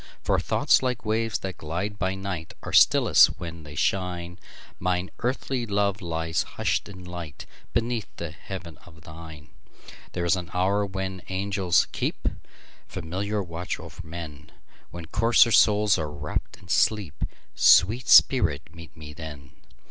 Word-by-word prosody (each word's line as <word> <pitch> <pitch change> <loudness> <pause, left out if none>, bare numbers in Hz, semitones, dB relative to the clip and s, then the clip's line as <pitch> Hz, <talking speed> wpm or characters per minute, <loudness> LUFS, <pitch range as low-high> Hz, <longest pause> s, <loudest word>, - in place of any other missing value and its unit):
For - - +2
thoughts, - - +3
like 125 -3 -2
waves 110 +1 0
that 95 -1 -6
glide 95 +7 -4
by 95 0 0
night, 95 -4 -5
Are - - -6
stillest - - +6
when 85 -1 -7
they 75 -1 -11
shine; 90 +1 -1 0.4
Mine 90 0 -1
earthly 125 0 -2
love 100 0 0
lies 80 -1 -1
hush'd - - -2
in 95 -2 -11
lightBeneath 90 - -5
the 85 -2 -5
heaven 85 +1 -9
of 80 -2 -16
thine. 80 -2 -11 0.6
There 90 -1 -2
is 85 - +3
an 90 -1 -5
hour 100 +3 +1
when 95 -1 -4
angels 95 -1 +1
keepFamiliar 100 +5 -5
watch 85 +1 -5
o'er - - -10
men, 80 -2 -9 0.4
When 85 -1 -8
coarser 115 +5 +4
souls 105 -2 +4
are 75 -1 -2
wrapp'd 75 0 -5
in 90 +1 -18
sleep—Sweet 105 - +2
spirit, 80 - +5
meet 85 -1 -13
me 75 -1 -10
then! 75 -3 -9
90 Hz, 135 wpm, -26 LUFS, 80-100 Hz, 0.6 s, stillest